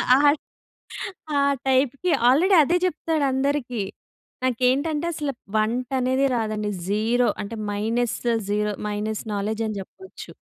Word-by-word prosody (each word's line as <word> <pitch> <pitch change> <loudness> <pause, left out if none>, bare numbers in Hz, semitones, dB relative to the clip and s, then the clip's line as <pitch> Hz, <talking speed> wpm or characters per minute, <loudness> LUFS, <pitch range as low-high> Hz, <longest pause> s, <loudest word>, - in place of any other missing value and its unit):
ఆ, - - +5 1.2
ఆ - - +4 0.3
టైప్‌కి 265 +6 +2 0.2
ఆల్రెడీ 350 +9 +5
అదే 345 +5 +2
చెప్తాడు 320 -3 0
అందరికి. 265 -4 -1 0.6
నాకేంటంటే 265 +6 +1
అసలు 295 -3 -3 0.2
వంట 235 +4 0
అనేది 260 +2 +2
రాదండి, 215 -2 -1 0.2
జీరో 230 +4 +2
అంటే 215 +3 -6 0.2
మైనస్ 225 +3 -1 0.3
జీరో 210 0 0 0.2
మైనస్ 210 +1 -3
నాలెడ్జ్ 215 +2 -2
అని 215 -2 -4
చెప్పొచ్చు. 380 - -12
250 Hz, 115 wpm, -24 LUFS, 215-280 Hz, 1.2 s, ఆ